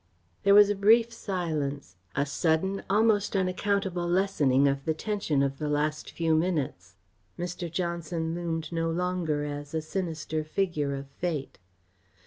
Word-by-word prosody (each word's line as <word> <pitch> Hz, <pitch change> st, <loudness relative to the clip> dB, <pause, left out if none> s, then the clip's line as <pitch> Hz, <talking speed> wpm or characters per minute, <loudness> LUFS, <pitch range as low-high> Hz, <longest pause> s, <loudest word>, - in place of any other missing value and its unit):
There 200 Hz, -, +5 dB
was 205 Hz, 0 st, +8 dB
a -, -, 0 dB
brief 225 Hz, +4 st, +4 dB
silence; 150 Hz, -, -3 dB, 0.2 s
a 140 Hz, -, +2 dB
sudden, 165 Hz, +6 st, 0 dB
almost 210 Hz, 0 st, +3 dB
unaccountable 190 Hz, -1 st, 0 dB
lessening 155 Hz, -8 st, +3 dB
of 140 Hz, 0 st, 0 dB
the 160 Hz, -1 st, 0 dB
tension 180 Hz, -8 st, 0 dB
of 135 Hz, 0 st, -2 dB
the 150 Hz, -1 st, -2 dB
last 150 Hz, +1 st, -1 dB
few 165 Hz, -1 st, +1 dB
minutes. 160 Hz, -3 st, -1 dB, 0.4 s
Mr. 175 Hz, -1 st, -4 dB
Johnson 170 Hz, -1 st, -2 dB
loomed 165 Hz, -2 st, -3 dB
no 165 Hz, -1 st, 0 dB
longer 170 Hz, -3 st, -1 dB
as 145 Hz, +1 st, -5 dB
a 160 Hz, -, 0 dB
sinister 160 Hz, -3 st, -3 dB
figure 155 Hz, -4 st, -1 dB
of 135 Hz, 0 st, -6 dB
fate. 145 Hz, 0 st, -4 dB
165 Hz, 140 wpm, -28 LUFS, 150-190 Hz, 0.4 s, was